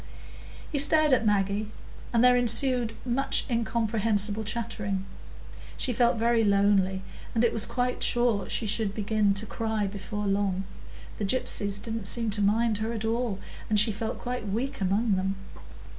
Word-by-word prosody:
He 290 - 0
stared 305 0 +4
at 230 -3 +3
Maggie, 205 +1 +1 0.4
and 235 0 +3
there 250 0 +6
ensued 245 0 +2
much 255 +2 0
incomprehensible 220 -3 +1
chattering. 210 -3 -3 0.7
She 250 - -1
felt 240 0 +2
very 230 0 +2
lonely, 200 -2 +2 0.3
and 230 +1 +3
was 220 - +2
quite 250 0 -1
sure 240 -5 +1
she 225 - -1
should 210 -1 -1
begin 210 -1 +1
to 205 +3 -1
cry 220 -1 -2
before 205 +1 -5
long; 195 -1 0 0.6
the - - -2
gypsies 205 -2 0
didn't 225 -1 -5
seem 230 0 0
to 205 0 -2
mind 215 +1 +2
her 220 +1 -2
at 225 -1 -4
all, 230 -2 -1 0.3
and 210 -1 +4
she 210 +2 +4
felt 220 +2 -4
quite 245 -3 -5
weak 255 +5 -3
among 200 +2 +1
them. 190 +1 -1
220 Hz, 155 wpm, -27 LUFS, 200-235 Hz, 0.7 s, there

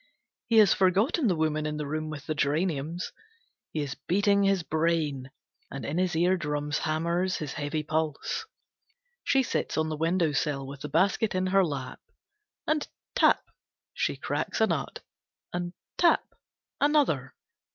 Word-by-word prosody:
He 230 - +3
has 210 -3 +7
forgotten 205 - +2
the 185 - +2
woman 155 -1 0
in 150 0 -3
the 150 - -3
room 155 +2 -3
with 150 -2 -7
the 155 - -1
geraniums. 155 +2 -1 0.6
He 155 - -2
is 140 -2 -3
beating 200 +4 +2
his 195 -3 +2
brain, 155 -5 0 0.4
and 135 - -6
in 155 +5 -1
his 185 -2 +1
eardrums 150 -4 +1
hammers 170 +4 0
his 150 -3 -4
heavy 150 +1 -2
pulse. 155 -1 -2 0.8
She 270 -1 +3
sits - - -2
on 155 0 +1
the 155 - -2
window 165 +1 +1
sill, 140 -1 -1
with 135 0 -9
the 150 - -5
basket 195 +5 +2
in 185 0 +1
her 195 +1 +4
lap. 140 -6 -4 0.7
And 310 -1 0 0.3
tap! - - +4 0.5
She - - -1
cracks - - -2
a - - +6
nut. - - -3 0.5
And 175 0 -2 0.3
tap! 345 -1 +3 0.5
Another. 285 - +2
160 Hz, 150 wpm, -28 LUFS, 150-185 Hz, 0.8 s, has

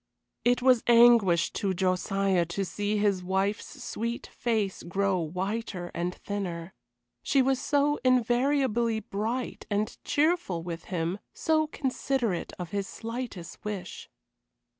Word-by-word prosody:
It 245 +1 +2
was 255 -3 +5
anguish 230 -8 +6
to 195 -3 -1
Josiah 190 0 +1
to 195 +3 -2
see 205 +3 -1
his 200 -3 +1
wife's 190 +3 -2
sweet 235 +2 -3
face 220 -5 -1
grow 195 +1 0
whiter 185 +2 -3
and 175 +1 -2
thinner; 185 -4 -5 0.5
she 270 -2 +3
was 265 0 +1
so 290 +1 +2
invariably 245 -2 +2
bright 220 +5 -3
and 210 0 -1
cheerful 295 - +1
with 170 -1 -6
him, 175 +2 -2 0.2
so 315 -1 +2
considerate 260 - -1
of 180 -3 -6
his 200 -1 -2
slightest 230 -6 -6
wish. 195 -4 -6
205 Hz, 120 wpm, -28 LUFS, 185-245 Hz, 0.5 s, anguish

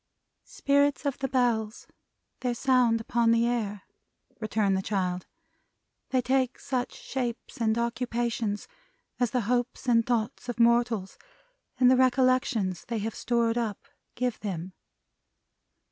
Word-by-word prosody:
"Spirits 285 - +1
of 280 -2 -1
the 270 - -1
Bells. 235 -4 0 0.5
Their 250 -2 -1
sound 250 -3 +3
upon 230 +1 +1
the 230 0 +4
air," 215 -5 -2 0.6
returned 215 -3 +1
the 190 - 0
child. 185 -3 -2 0.8
"They 255 -1 +1
take 260 0 +1
such 250 -2 -2
shapes 245 -3 -5
and 220 0 +2
occupations 235 -3 -2 0.5
as 245 -2 +2
the 250 +2 0
hopes 245 +4 -1
and 230 -2 +4
thoughts 235 +1 -2
of 240 - -4
mortals, 235 -4 +2 0.6
and 250 -1 +6
the - - +6
recollections 255 -7 +2
they 230 - -3
have 220 +1 -3
stored 235 -1 0
up, 220 -4 -4 0.3
give 250 -2 -1
them." 185 -3 -5
235 Hz, 130 wpm, -28 LUFS, 220-250 Hz, 0.8 s, and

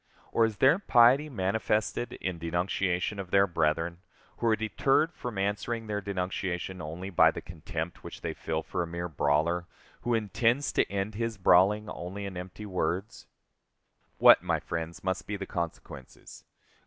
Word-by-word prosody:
Or 115 - +4
is 110 -2 -3
their 135 +8 +5
piety 130 -2 +5
manifested 110 +1 -1
in 90 -3 -4
denunciation 90 +3 -1
of 95 -2 -5
their 100 +1 +5
brethren, 85 -1 0 0.4
who 120 - -1
are 110 - +4
deterred 135 - +1
from 120 -4 -6
answering 105 +4 -1
their 105 -1 -2
denunciation 95 -2 -3
only 85 +5 -6
by 90 - +6
the - - -4
contempt 80 0 -6
which - - -9
they - - -3
feel 80 0 -3
for 90 - -3
a 85 - -2
mere 85 +1 -4
brawler, 80 +3 +1 0.3
who 120 -1 +1
intends 115 +6 +1
to - - +1
end 100 +2 -2
his 115 +1 -3
brawling 100 +3 +4
only 100 +1 -6
in 100 -2 -6
empty 90 +4 -7
words? 95 +2 -3 0.9
What, - - +8
my - - 0
friends, 85 0 -5
must 95 0 -2
be 105 - -3
the 100 - -5
consequences? 85 -7 -7
95 Hz, 160 wpm, -29 LUFS, 85-110 Hz, 0.9 s, What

